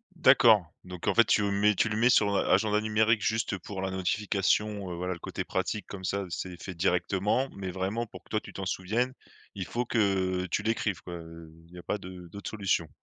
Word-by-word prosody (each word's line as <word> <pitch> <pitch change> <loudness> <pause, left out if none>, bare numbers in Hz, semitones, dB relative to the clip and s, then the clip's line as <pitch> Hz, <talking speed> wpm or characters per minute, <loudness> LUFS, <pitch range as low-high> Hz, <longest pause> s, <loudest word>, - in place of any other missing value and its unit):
D'accord, 120 - +6 0.2
donc 90 -1 -8
en - - +4
fait, 115 - +6
tu 105 - +3
le 100 - 0
mets 105 +1 +3
tu 110 - +2
le 105 - -2
mets 120 +3 +4
sur 105 -4 +4
a - - +1
agenda 105 +2 +3
numérique 110 0 +2
juste 110 -3 0
pour 95 +1 -7
la 95 - -1
notification, 100 +1 0
heu, 85 - -4
voilà, 90 +1 -2
le 85 - -9
côté - - -5
pratique 105 - -2
comme 95 -2 -8
ça, 100 +2 -1
c'est 90 +1 -5
fait 95 - -6
directement, 95 +7 +1
mais 95 -2 -4
vraiment 95 +6 -2
pour 110 - -12
que - - -25
toi 110 - 0
tu - - -11
t'en 95 - -5
souviennes, 110 +8 -1 0.4
il 95 -3 -4
faut 120 +9 -2
que 95 -5 +1
tu 90 - -1
l'écrives, 110 -2 -1
quoi, 90 - -7
heu, 80 -1 -10 0.2
il - - -19
y - - -10
a 90 - -9
pas - - -1
de 90 -2 -10
d'autres 100 0 -6
solutions. 95 -6 0
100 Hz, 230 wpm, -29 LUFS, 90-110 Hz, 0.4 s, D'accord